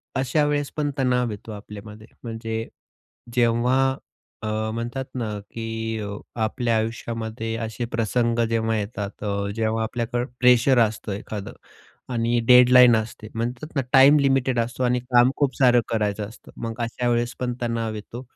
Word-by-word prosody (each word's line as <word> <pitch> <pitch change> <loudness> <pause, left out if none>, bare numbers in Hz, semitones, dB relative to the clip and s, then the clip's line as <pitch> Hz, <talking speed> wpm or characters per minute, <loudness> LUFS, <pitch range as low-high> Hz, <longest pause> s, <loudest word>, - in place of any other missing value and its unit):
अशा 135 +3 +1
वेळेस 145 -1 -1
पण 145 -1 0
तणाव 125 -3 +1
येतो 105 +2 -8
आपल्यामध्ये. 105 +1 -10 0.2
म्हणजे 115 -1 -4 0.7
जेव्हा 125 +2 +2 0.5
अ, 110 - -4 0.3
म्हणतात 120 +3 -4
ना 115 -4 -2 0.2
की 115 0 -4
अ, 100 - -4 0.3
आपल्या 115 +1 0
आयुष्यामध्ये 115 0 -3
असे 115 +1 -4
प्रसंग 115 +1 0
जेव्हा 115 -1 0
येतात, 100 -1 -5
अ, 100 -1 -1
जेव्हा 110 0 0
आपल्याकडे 120 +1 -2 0.2
प्रेशर 125 +1 +5
असतं 110 -2 0
एखादं 100 0 -6 0.6
आणि 120 0 +1
डेडलाईन 125 -1 +8
असते 110 -1 -4
म्हणतात 125 +7 -4
ना, 140 - +2
टाइम 135 +3 +8
लिमिटेड 135 -3 +2
असतो 120 +2 -2
आणि 125 0 +2
काम 125 +1 +4
खूप 140 -3 +1
सारं 125 -2 +5
करायचं 105 -2 -1
असतं. 110 - -15
मग 115 -1 -4
अशा 120 +1 -2
वेळेस 120 0 0
पण 125 -1 -1
तणाव 115 -2 -2
येतो. 115 +3 -8
115 Hz, 145 wpm, -24 LUFS, 110-125 Hz, 0.7 s, डेडलाईन